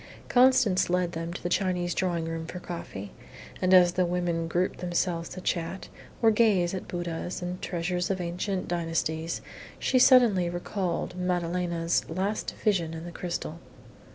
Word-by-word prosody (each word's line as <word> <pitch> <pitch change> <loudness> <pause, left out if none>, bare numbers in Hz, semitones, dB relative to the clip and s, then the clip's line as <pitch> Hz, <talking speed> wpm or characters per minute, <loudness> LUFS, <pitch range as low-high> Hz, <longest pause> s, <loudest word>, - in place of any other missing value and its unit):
Constance 250 -8 +4
led 180 -1 +1
them 165 0 -4
to 175 - -7
the - - 0
Chinese 180 -1 0
drawing 175 -3 0
room 165 0 -4
for 180 - -6
coffee, 135 - -7 0.5
and 185 - +2
as 180 -1 +7
the 185 - +2
women 175 -1 -1
grouped 175 +2 0
themselves 175 -1 -1
to 185 - -7
chat, 170 +1 -2 0.3
or 225 - +7
gaze 205 -6 +3
at 190 - -5
Buddhas 175 0 -4
and 180 +1 -4
treasures 180 0 -2
of 190 -1 -1
ancient 180 +2 -2
dynasties, 165 -1 -2 0.4
she 255 - +2
suddenly 235 -9 +6
recalled 175 0 -3
Madalena's 175 -1 0
latest 190 +6 -2
vision 175 -7 0
in 160 +1 -7
the 175 - -7
crystal. 170 -2 -4
175 Hz, 155 wpm, -28 LUFS, 170-185 Hz, 0.5 s, as